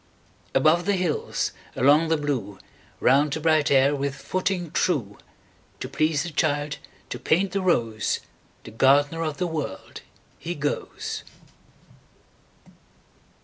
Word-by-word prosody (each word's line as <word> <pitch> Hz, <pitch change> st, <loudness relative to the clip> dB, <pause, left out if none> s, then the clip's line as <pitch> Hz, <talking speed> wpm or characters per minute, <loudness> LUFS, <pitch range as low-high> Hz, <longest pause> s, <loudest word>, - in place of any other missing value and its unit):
Above 155 Hz, +6 st, +4 dB
the 205 Hz, -, +3 dB
hills, 180 Hz, -5 st, -1 dB, 0.2 s
along 145 Hz, +5 st, +4 dB
the 160 Hz, 0 st, +2 dB
blue, 130 Hz, -10 st, -3 dB, 0.4 s
Round 140 Hz, +3 st, +4 dB
the 160 Hz, -, -2 dB
bright 155 Hz, -1 st, +3 dB
air 140 Hz, +1 st, +4 dB
with 140 Hz, 0 st, -2 dB
footing 185 Hz, -3 st, -2 dB
true, 125 Hz, -, 0 dB, 0.6 s
To -, -, -4 dB
please 150 Hz, +2 st, +1 dB
the 175 Hz, -, -5 dB
child, 145 Hz, -2 st, 0 dB, 0.3 s
to -, -, -4 dB
paint 185 Hz, +4 st, +1 dB
the 195 Hz, +1 st, -1 dB
rose, 115 Hz, -, +1 dB, 0.4 s
The -, -, -10 dB
gardener 145 Hz, +6 st, +3 dB
of 155 Hz, -3 st, -2 dB
the 180 Hz, -, -1 dB
World, 150 Hz, -, -5 dB, 0.4 s
he 175 Hz, +1 st, -4 dB
goes. 145 Hz, 0 st, -3 dB
150 Hz, 125 wpm, -25 LUFS, 140-165 Hz, 0.6 s, Above